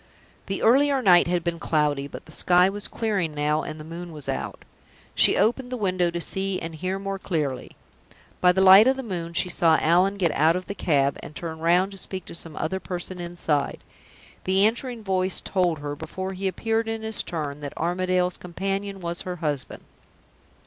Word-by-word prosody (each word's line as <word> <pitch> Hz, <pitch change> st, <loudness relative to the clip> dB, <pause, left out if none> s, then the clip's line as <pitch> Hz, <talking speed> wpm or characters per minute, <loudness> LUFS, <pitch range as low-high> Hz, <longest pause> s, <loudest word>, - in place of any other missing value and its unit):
The 195 Hz, -1 st, -3 dB
earlier 275 Hz, +4 st, +4 dB
night 175 Hz, -4 st, +6 dB
had 175 Hz, -1 st, 0 dB
been 170 Hz, -1 st, -2 dB
cloudy, 150 Hz, -4 st, 0 dB
but -, -, -10 dB
the 155 Hz, -, -14 dB
sky 180 Hz, +3 st, +4 dB
was 205 Hz, +1 st, -5 dB
clearing 195 Hz, -9 st, -2 dB
now 150 Hz, +1 st, +1 dB
and 155 Hz, -, -7 dB
the -, -, -8 dB
moon 170 Hz, +2 st, -8 dB
was 150 Hz, -3 st, -9 dB
out. -, -, -4 dB, 0.5 s
She -, -, +4 dB
opened 245 Hz, +3 st, +1 dB
the 250 Hz, -, -2 dB
window 185 Hz, -4 st, +1 dB
to 170 Hz, 0 st, -4 dB
see 190 Hz, +2 st, -1 dB
and 165 Hz, 0 st, -6 dB
hear 185 Hz, +4 st, -3 dB
more 195 Hz, 0 st, -4 dB
clearly. 145 Hz, -9 st, -3 dB, 0.7 s
By 180 Hz, -, +6 dB
the 190 Hz, +1 st, +1 dB
light 190 Hz, +4 st, +9 dB
of 265 Hz, 0 st, +3 dB
the 265 Hz, -, -4 dB
moon 170 Hz, -6 st, -5 dB
she 175 Hz, -, +3 dB
saw 165 Hz, -2 st, +3 dB
Allan 180 Hz, +5 st, +3 dB
get 175 Hz, -5 st, +2 dB
out 160 Hz, +3 st, +3 dB
of 180 Hz, 0 st, -3 dB
the 200 Hz, -, -5 dB
cab, 140 Hz, -7 st, +1 dB
and 150 Hz, -, -10 dB
turn 160 Hz, -2 st, -6 dB
round 175 Hz, +4 st, +3 dB
to 195 Hz, -, -10 dB
speak 185 Hz, -2 st, -6 dB
to -, -, -10 dB
some 165 Hz, -2 st, -6 dB
other 190 Hz, -, -2 dB
person 180 Hz, 0 st, -6 dB
inside. 170 Hz, -5 st, -2 dB, 0.6 s
The 190 Hz, +2 st, +4 dB
answering 235 Hz, +1 st, -1 dB
voice 185 Hz, -1 st, +1 dB
told 180 Hz, -4 st, 0 dB
her, 145 Hz, 0 st, -4 dB
before 185 Hz, +5 st, -5 dB
he 190 Hz, +1 st, -3 dB
appeared 225 Hz, +4 st, -1 dB
in 225 Hz, 0 st, -3 dB
his 220 Hz, -1 st, +1 dB
turn, 150 Hz, -4 st, -4 dB
that 145 Hz, -1 st, -7 dB
Armadale's 180 Hz, +1 st, 0 dB
companion 195 Hz, +2 st, -4 dB
was 170 Hz, 0 st, -3 dB
her 180 Hz, -1 st, -5 dB
husband. 150 Hz, -5 st, -4 dB
180 Hz, 195 wpm, -25 LUFS, 165-195 Hz, 0.7 s, light